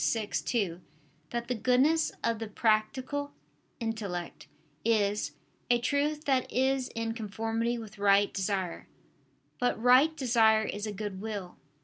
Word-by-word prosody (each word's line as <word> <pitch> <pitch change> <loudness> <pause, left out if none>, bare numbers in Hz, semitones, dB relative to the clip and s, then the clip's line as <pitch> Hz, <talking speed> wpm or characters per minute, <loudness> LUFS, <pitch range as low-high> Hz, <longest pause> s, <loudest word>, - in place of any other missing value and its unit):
vi, 225 -2 -2
2) 195 -5 -1 0.5
that 235 0 -3
the 250 - 0
goodness 255 +8 +3
of 230 -1 0
the 225 - -4
practical 255 +7 0 0.5
intellect 210 -7 -4 0.4
is 210 -2 +1 0.4
"a 240 - +5
truth 290 +5 0
that 265 -3 +1
is 265 0 +1
in 225 0 -2
conformity 225 +2 -2
with 220 -3 -9
right 200 0 +4
desire." 190 -3 -2 0.7
But 245 -2 +1
right 255 +7 +5
desire 225 -4 +4
is 210 0 -4
a - - -3
good 205 -2 -5
will. 205 -5 -5
225 Hz, 130 wpm, -30 LUFS, 205-250 Hz, 0.7 s, a